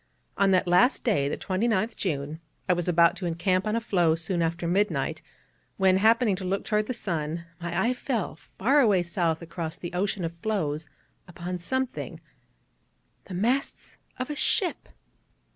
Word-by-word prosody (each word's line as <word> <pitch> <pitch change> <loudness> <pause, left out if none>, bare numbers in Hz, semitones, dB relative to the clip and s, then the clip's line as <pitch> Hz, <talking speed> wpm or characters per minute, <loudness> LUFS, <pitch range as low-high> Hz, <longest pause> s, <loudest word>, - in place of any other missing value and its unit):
On 200 0 +3
that 185 -1 +3
last 205 +9 +4
day 145 - +2
the - - -2
29th 220 +3 0
June 150 -3 -3 0.3
I 180 - +4
was 175 0 -2
about 170 0 +5
to 180 - -3
encamp 185 +3 0
on 215 - +1
a - - +2
floe 175 -8 +2
soon 170 +2 0
after 170 +1 -1
midnight, 200 +4 0 0.6
when, 190 -1 +4
happening 220 0 +4
to 190 - -6
look 190 +2 -1
toward 210 0 +1
the 255 - -1
sun, 170 -5 -3 0.2
my 170 +1 -2
eye 235 +6 +2
fell, 245 - -2
far 250 - +1
away 205 -9 +4
south 170 -1 -1
across 165 -1 -5
the 175 0 -7
ocean 185 0 -1
of 165 - -4
floes, 160 -7 -2 0.4
upon 180 +1 -5
something 260 +8 -3 1.1
the 185 - -7
masts 240 +9 -1 0.2
of 255 +3 -3
a - - -3
ship. 350 +4 0
185 Hz, 165 wpm, -27 LUFS, 170-215 Hz, 1.1 s, about